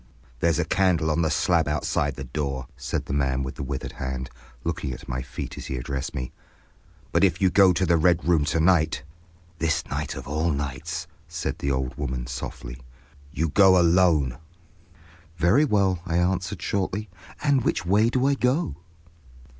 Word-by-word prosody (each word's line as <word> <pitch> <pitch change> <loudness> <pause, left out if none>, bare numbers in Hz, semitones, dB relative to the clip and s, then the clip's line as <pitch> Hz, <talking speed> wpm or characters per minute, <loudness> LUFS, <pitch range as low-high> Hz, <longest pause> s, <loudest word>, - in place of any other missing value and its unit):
"There's 85 +1 +2
a - - +1
candle 85 -5 +2
on 85 - +1
the 80 - +2
slab 80 0 +2
outside 75 -2 0
the 70 - -6
door," 65 -1 -3
said - - -3
the - - -4
man 65 -2 +1
with 65 - -4
the - - -7
withered 70 0 -4
hand, 65 0 -5 0.3
looking 70 - -2
at - - -10
my 65 +1 -3
feet 65 +2 -7
as - - -7
he 65 - -3
addressed 65 +1 -4
me. 65 -1 -4 0.8
"But - - +2
if - - +3
you 95 -2 +3
go 95 -1 +6
to 90 +1 +1
the 85 -1 +3
Red 85 +2 +3
Room 85 -4 +4
to 80 - 0
night—" 80 -2 +3 0.6
"This 80 -1 0
night - - -3
of 70 -1 -8
all 80 +4 0
nights!" 75 +3 -3 0.2
said 80 0 -4
the 70 - -1
old 65 -1 -1
woman, 65 -3 -3
softly. 60 0 -7 0.5
"—You 80 0 -1
go 95 +2 +6
alone." 85 -7 +3 1.0
"Very 95 - +4
well," 100 - +2
I 85 0 0
answered, 90 0 0
shortly, 100 +2 -1 0.4
"and 140 -3 +3
which 75 - 0
way 105 +5 +4
do 130 +1 +1
I 140 - +4
go?" 130 - 0
80 Hz, 180 wpm, -25 LUFS, 70-90 Hz, 1.0 s, go